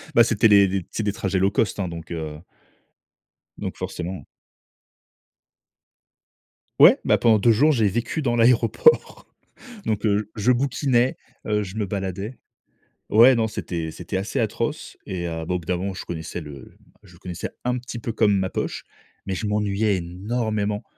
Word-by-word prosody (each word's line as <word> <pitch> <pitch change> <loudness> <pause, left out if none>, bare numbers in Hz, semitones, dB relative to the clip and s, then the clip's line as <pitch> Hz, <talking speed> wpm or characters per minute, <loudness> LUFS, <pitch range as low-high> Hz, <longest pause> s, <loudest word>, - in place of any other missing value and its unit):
Bah, 115 - +8
c'était 115 0 +3
les 100 -2 +6
les 95 -2 -2
c'est 110 - -3
des 100 -1 -1
trajets 95 -2 -1
low 95 +1 +2
cost, 105 -1 0
hein, 95 - -1
donc, 85 0 -8
heu 80 -2 -5 1.2
donc - - -5
forcément. 90 +2 -5 2.6
Ouais, - - +8
bah, - - +3
pendant 110 -3 +4
2 115 +2 +4
jours, 150 +8 +4
j'ai 110 -5 +2
vécu 120 - -2
dans 120 -3 0
l'aéroport, 120 - +3 0.6
donc 110 0 -1
heu, 105 0 +1
je 110 +4 +2
bouquinais, 130 -1 +1 0.3
heu, 105 -1 +1
je 95 +3 -8
me 105 - 0
baladais 100 +4 -4 0.7
Ouais, 120 +5 +7
non, 110 -1 +1
c'était 85 -6 -4
c'était 90 +3 -5
assez 95 - -3
atroce - - -3
et 85 -2 -4
heu, 80 -1 -4
bah, 90 - -2
au - - -1
bout 85 - -14
d'un 90 - 0
moment, 95 +1 -3
je - - -7
connaissais 85 +1 -6
le 70 -4 -11 0.3
je 90 - -17
connaissais 90 -2 -6
un 125 0 0
petit 120 -1 -7
peu 115 - -4
comme 105 -2 +2
ma 95 -1 -1
poche, - - -4 0.4
mais 95 -1 -3
je 105 - -3
m'ennuyais 105 0 +1
énormément. 105 +4 -2
100 Hz, 170 wpm, -23 LUFS, 90-115 Hz, 2.6 s, Bah